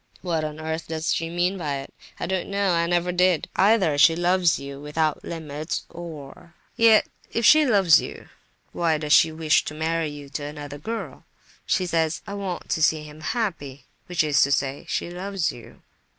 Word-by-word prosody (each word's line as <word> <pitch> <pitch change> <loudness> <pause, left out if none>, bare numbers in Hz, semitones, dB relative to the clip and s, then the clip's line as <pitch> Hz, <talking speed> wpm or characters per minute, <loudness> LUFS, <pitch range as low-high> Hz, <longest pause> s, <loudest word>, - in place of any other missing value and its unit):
What 165 -4 -1
on 155 0 -5
earth 160 +1 -4
does 160 0 -1
she 165 0 -2
mean 175 +3 0
by 150 -4 -2
it? 135 0 -7 0.3
I - - -2
don't 185 0 -2
know, 200 -2 +1
and 170 - +2
I 170 - +2
never 175 +1 +1
did. 180 -2 +2
Either 190 -7 +3
she 165 +2 +6
loves 175 -1 +2
you 140 0 -8
without 150 +1 -1
limits 155 -1 -5
or—yet, 170 +7 0 0.3
if 230 - 0
she 310 +3 +7
loves 195 -9 +5
you, - - -9 0.4
why 165 -2 +1
does 150 -1 0
she 160 - +6
wish 160 -1 +2
to 150 - -6
marry 160 +1 -1
you 145 -1 -9
to 145 - -5
another 145 0 -7
girl? 225 +9 -6 0.4
She 185 - +1
says, 165 -2 0
'I 200 - -7
want 195 -3 -5
to 160 - -1
see 155 0 +3
him 150 +1 -12
happy,' 150 - -3 0.2
which 175 -3 +1
is 145 -3 +3
to 140 - +3
say—she 140 +5 -2
loves 185 -1 -2
you." 120 - -14
165 Hz, 185 wpm, -24 LUFS, 150-180 Hz, 0.4 s, she